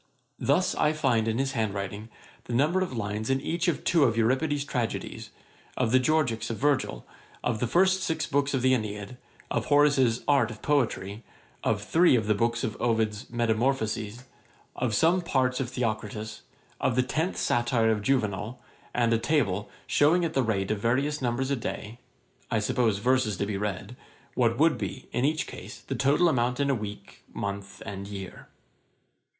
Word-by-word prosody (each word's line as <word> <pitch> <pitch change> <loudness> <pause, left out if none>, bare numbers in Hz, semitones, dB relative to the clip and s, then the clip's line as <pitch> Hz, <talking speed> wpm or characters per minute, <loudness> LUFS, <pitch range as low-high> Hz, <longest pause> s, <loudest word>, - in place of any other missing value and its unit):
Thus - - +2
I 150 0 +2
find 125 -7 +1
in 110 0 0
his 135 +1 0
hand 110 -5 -1
writing 100 +3 -5 0.4
the 120 - -5
number 155 +9 +2
of 185 - -1
lines 105 +1 -3
in 135 0 +2
each 170 +5 -2
of 170 - 0
two 165 -5 +4
of 115 -2 +1
Euripides' 140 +5 +1
Tragedies, 120 -5 -3 0.5
of 120 -3 +1
the 130 - +6
Georgicks 125 -6 +1
of 115 - -3
Virgil, 135 - 0 0.4
of 115 -3 0
the 125 - 0
first 190 +6 +3
six 160 -3 -1
books 140 0 0
of 130 - -1
the 130 0 +5
Æneid, 105 0 -3 0.3
of - - 0
Horace's 140 -5 +3
Art 140 -6 +4
of 110 -2 -10
Poetry, 115 -7 0 0.4
of 105 -2 0
three 165 +6 +4
of 110 -3 +1
the 105 - +3
books 115 +2 0
of 110 -5 -2
Ovid's 110 0 0
Metamorphosis, 115 -1 -1 0.5
of 120 -4 -1
some 170 - +3
parts 130 -6 +1
of 130 -3 -2
Theocritus, 110 -3 -3 0.4
and - - +1
of 120 - -2
the 125 - +3
tenth 155 +8 -1
Satire 120 -1 +2
of 105 -1 0
Juvenal; 110 -1 -1 0.4
and 120 -1 +3
a 115 - +2
table, 110 -8 0 0.2
shewing 170 +4 +3
at 165 - -3
the 135 - +2
rate 105 -4 0
of 110 - -1
various 135 +7 0
numbers 130 +2 -1
a - - +3
day 115 -1 -5 0.5
(I 115 - +1
suppose 110 0 +1
verses 125 -2 +1
to 100 - -1
be 100 0 -3
read), 105 +4 -4 0.4
what 115 -2 +2
would 160 +1 +3
be, 130 - -5
in 125 - 0
each 155 +1 +1
case, - - -9
the - - -5
total 145 +6 +3
amount 125 -4 +1
in 140 0 +2
a - - +2
week, 105 -4 -7
month, 100 0 -5
and 100 0 -6
year. 100 -2 -8
120 Hz, 180 wpm, -27 LUFS, 110-140 Hz, 0.5 s, the